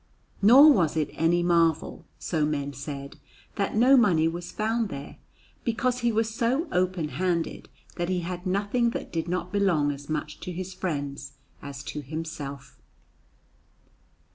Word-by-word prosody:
Nor 270 +9 +9
was 165 - +1
it 155 - 0
any 170 +2 +2
marvel, 170 -2 +1
so 160 -3 -1
men 145 -2 -1
said, 140 0 -7 0.3
that 200 0 -2
no 250 +5 +6
money 180 -10 +4
was 170 +1 -5
found 220 0 -1
there, 140 -3 -8 0.5
because 250 +1 0
he 240 -1 +1
was 220 0 0
so 250 +9 0
open 180 -3 0
handed 175 -2 -2 0.3
that 175 0 -1
he 180 -1 0
had 180 +2 -5
nothing 205 +6 +1
that - - -10
did 165 0 -2
not 180 +1 -3
belong 175 -8 +2
as 140 +1 -9
much 150 0 -3
to 180 - -6
his 185 +2 -5
friends 145 -7 -4 0.3
as 140 -1 -8
to 150 +2 -5
himself. 145 -2 -7
175 Hz, 150 wpm, -26 LUFS, 150-205 Hz, 0.5 s, Nor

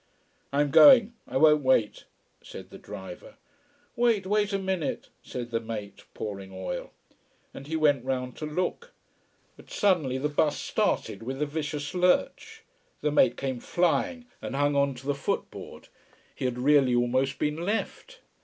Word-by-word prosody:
"I 140 +1 +2
am 145 -1 0
going! 235 - +8
I - - -2
won't 150 +1 +5
wait," 130 -5 +1 0.4
said - - -11
the - - -11
driver. 95 -2 -10 0.6
"Wait 235 -5 +2
wait 210 +1 +1
a 195 - +1
minute," 190 -4 -3
said 120 -1 -7
the 115 - 0
mate, 110 -3 -7
pouring 100 -2 -6
oil. 95 0 -5 0.6
And 140 - -10
he 160 - -3
went 145 -5 +2
round 125 -1 -3
to 155 - -5
look. 185 - -3 0.6
But - - -16
suddenly 170 - +1
the 140 +3 -1
bus 150 0 +1
started, 100 - -1
with 130 +4 -5
a 150 - +1
vicious 150 -1 -4
lurch. 445 - 0 0.4
The 150 - 0
mate 130 -4 +3
came 130 -2 -3
flying 180 - 0 0.2
and - - -5
hung 145 +1 +1
on 140 -1 +2
to 125 +2 -12
the 145 - +1
footboard. 140 -1 -5 0.5
He - - -5
had 125 -1 -1
really 135 -1 +4
almost 130 +3 +1
been 150 0 -1
left. 225 - -4
145 Hz, 160 wpm, -27 LUFS, 130-180 Hz, 0.6 s, going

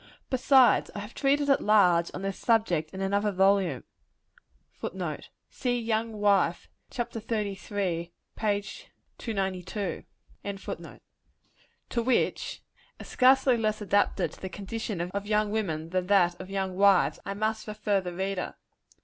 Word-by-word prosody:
Besides, 260 -1 +5
I - - -3
have 205 +3 -9
treated 285 +1 +1
at 275 - +4
large 180 -5 +4
on 190 - -6
this 195 -1 -3
subject 180 -9 +1
in 190 +4 -7
another 200 +2 +1
volume, 190 -7 +2 0.9
[Footnote: 175 -5 -5 0.2
See 245 -1 -1
the 230 - -6
Young 225 0 0
Wife, 200 -4 +2 0.2
chap. 240 -2 -4
xxxiii. 200 -5 -3 0.3
p. 205 -2 0 0.6
292.] 195 -2 -3 1.8
to 235 - 0
which, 250 +2 0 0.4
as - - -9
scarcely 260 0 +4
less 215 -1 0
adapted 205 -1 +1
to - - -16
the 190 - -4
condition 205 0 -4
of 200 +4 -4
young 210 -1 +1
women 165 -7 -2
than 185 -1 -1
that 180 -3 +3
of 185 - -9
young 190 -1 -2
wives, 195 -1 +4
I 195 - -4
must 220 +1 -2
refer 210 -2 0
the 180 -1 -6
reader. 190 0 -3
200 Hz, 135 wpm, -28 LUFS, 185-220 Hz, 1.8 s, Besides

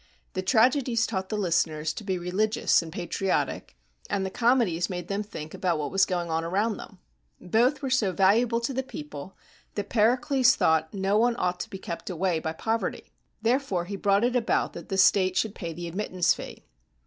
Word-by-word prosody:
The 185 - -2
tragedies 235 +3 +3
taught 190 -3 -3
the 215 - -2
listeners 160 -5 0
to - - -7
be 190 -2 -1
religious 185 +5 +1
and 165 -1 -8
patriotic, 180 - -2 0.3
and 195 - -1
the 190 - -4
comedies 230 -8 +2
made 180 -2 -5
them 200 +1 -1
think 160 -8 -8
about 175 -3 0
what 150 -2 -3
was 195 - +3
going 175 -2 -2
on 160 0 0
around 200 +6 0
them. - - -11 0.4
Both 240 - +1
were, 265 - -2
so 225 -7 +2
valuable 220 +5 +3
to 235 +3 -2
the 265 - 0
people 150 - -9 0.4
that 205 -1 -4
Pericles 250 +3 +3
thought 160 0 +2
no 195 +1 +1
one 240 +1 +3
ought 180 -3 -1
to - - -5
be 195 - -6
kept 170 -1 -6
away 180 -1 0
by 160 0 -3
poverty. 225 +7 -3 0.3
Therefore 230 -7 +1
he 200 +3 -5
brought 200 +1 +2
it 245 +1 +1
about 235 -2 +1
that 170 - -9
the 195 - -1
state 185 -1 +4
should 220 -2 0
pay 170 -5 -6
the 170 +1 -6
admittance 185 0 +1
fee. - - -10
195 Hz, 195 wpm, -27 LUFS, 175-225 Hz, 0.4 s, state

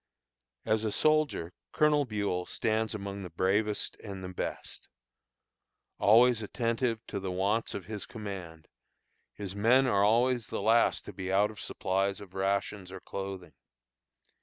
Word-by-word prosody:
As 110 0 +1
a 110 - 0
soldier, 155 - +2 0.2
Colonel 150 -1 +3
Buel 100 -5 -2
stands 110 -1 0
among 100 -1 -5
the 90 - -7
bravest 100 +5 0
and 95 -3 -7
the 90 - -5
best. 90 - -5 1.1
Always 115 +2 +5
attentive 115 +1 -1
to 100 - -4
the 95 -1 -4
wants 100 +5 0
of 95 - -5
his 105 0 -6
command, 95 -7 -7 0.7
his 100 -2 -6
men 120 +6 +4
are 100 -6 +3
always 120 +2 +3
the - - -4
last 115 +3 +3
to 105 - -8
be 95 0 -4
out 100 +2 +3
of 105 - -13
supplies 95 +1 -1
of 95 -3 -12
rations 95 0 -1
or 95 - -7
clothing. 95 -4 -6
100 Hz, 145 wpm, -30 LUFS, 95-115 Hz, 1.1 s, Always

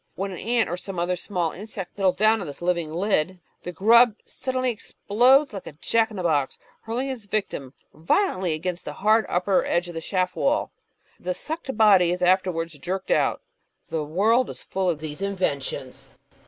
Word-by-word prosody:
When 195 +1 -3
an 180 - -7
ant 235 0 +1
or 175 - -3
some 190 0 -7
other 175 +1 0
small 175 -2 -2
insect 195 -2 -8
settles 190 -2 +2
down 215 +2 +3
on 175 - -5
this 145 - -8
living 170 -3 0
lid, 185 0 0 0.2
the 180 - -6
grub 225 +5 +5
suddenly 255 -1 -2
explodes 245 +5 +2
like 195 - -7
a - - -8
jack 225 +9 +1
in 215 - -9
the 185 - -3
box, 145 -5 +1 0.2
hurling 240 +4 -3
its 245 -6 -6
victim 195 -10 -3 0.2
violently 185 - +1
against 175 +3 -3
the - - -5
hard 215 +2 +2
upper 180 +2 +2
edge 175 +1 0
of - - -7
the 165 - -5
shaft 185 +2 -1
wall. 290 +3 +1 0.5
The 180 0 -3
sucked 310 -6 -5
body 195 -5 +6
is 180 0 -2
afterwards 180 -3 +1
jerked 185 +5 -4
out. - - +2 0.5
The 160 -2 -1
world 215 +11 +2
is - - -9
fuU 190 -1 +1
of 160 -4 -1
these 155 +2 -5
inventions. 145 -9 -2
185 Hz, 185 wpm, -24 LUFS, 175-220 Hz, 0.5 s, body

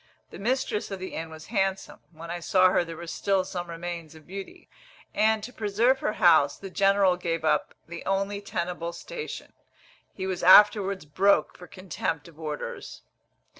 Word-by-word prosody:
The - - -10
mistress 240 -1 -1
of 195 - -4
the 185 - -7
inn 165 0 -5
was 155 -1 -11
handsome; 195 -2 -1
when 165 +1 -9
I 175 - -4
saw 185 +2 +4
her 180 - +2
there 165 -1 -8
were 170 - -7
still 190 +2 0
some 175 -2 -5
remains 170 -1 -6
of 155 -1 -15
beauty; 195 +1 -9 0.5
and, 220 0 +2
to 250 - -7
preserve 225 +5 +1
her 215 - -1
house, 145 -7 +4
the 195 -1 -9
general 195 -1 +3
gave 165 -2 -2
up 150 -1 +1
the 170 +1 -8
only 195 +1 -1
tenable 170 -3 -4
station. 455 - -7 0.6
He 190 - -4
was 185 -2 -3
afterwards 200 0 +6
broke 185 +2 +2
for 180 - -12
contempt 170 -4 -4
of 165 -2 -17
orders. 150 -2 -6
185 Hz, 170 wpm, -27 LUFS, 170-200 Hz, 0.6 s, afterwards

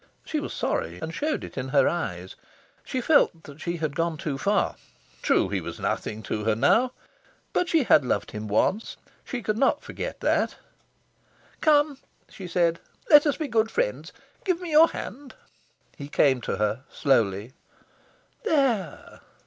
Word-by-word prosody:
She - - -2
was - - -5
sorry, 85 +2 -2
and 160 - -5
showed 305 - -2
it - - -7
in 130 - -4
her 140 +1 +4
eyes. 95 - -3 0.5
She 255 - -3
felt 290 -3 +4 0.2
she 170 +1 -3
had 155 -3 -3
gone 165 0 -1
too 150 -2 -3
far. 205 +5 +1 0.5
True, - - +2
he - - -1
was - - -7
nothing 110 +1 -3
to 105 0 -3
her 110 -1 +2
now. 225 - +3 0.6
But 360 - +1
she 325 -4 +3
had 155 - +5
loved 125 - -1
him 105 0 -6
once. 185 - 0 0.3
She 245 -4 -5
could 215 +1 -1
not 280 +2 +2
forget - - -6
that. - - +1 1.1
"Come!" 295 -3 +3 0.3
she 190 - -9
said. 170 -1 +1 0.3
"Let 295 0 +8
us 290 - +1
be 310 - -3
good 225 -3 +1
friends. - - -2 0.3
Give 365 -3 0
me 355 -3 -6
your 310 +2 +7
hand!" 275 -3 -8 0.6
He 140 -3 -8
came 135 -3 +3
to - - -2
her, 105 +4 -1
slowly. 115 -5 +1 0.9
"There!" 270 - 0
175 Hz, 160 wpm, -26 LUFS, -, 1.1 s, Let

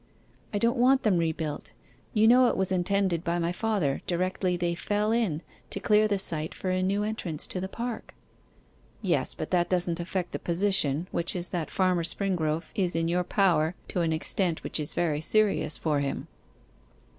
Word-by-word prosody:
'I 205 - -1
don't 235 +4 +1
want 260 +2 +4
them 195 -6 +3
rebuilt; 155 -8 -3 0.4
you 220 0 +4
know 250 +2 +6
it - - 0
was 190 -1 +4
intended 185 -2 0
by 170 -1 -1
my 170 0 0
father, 185 -8 -1
directly 180 0 0
they 175 0 -1
fell 205 +5 -1
in, 200 -9 0 0.3
to - - -1
clear 210 +1 +3
the 205 -1 0
site 160 -4 0
for 185 - -3
a 185 0 0
new 200 +2 0
entrance 195 -8 -4
to 185 - -4
the 190 - -4
park?' 235 +2 -6 0.9
'Yes, - - +1
but - - -6
that 175 -1 +2
doesn't 175 -2 +3
affect 175 +1 -3
the - - -4
position, 170 -4 +1
which 170 +2 -2
is 175 0 0
that 170 -4 -3
Farmer 185 -2 +1
Springrove 165 -3 -1
is 180 -4 0
in 165 0 0
your 180 +1 +1
power 175 -4 +2
to 180 - -1
an 165 -1 +1
extent 165 +2 0
which - - -2
is 150 - -4
very 155 -4 0
serious 205 -4 +1
for 150 -3 0
him. 140 -1 -3
180 Hz, 185 wpm, -27 LUFS, 165-200 Hz, 0.9 s, know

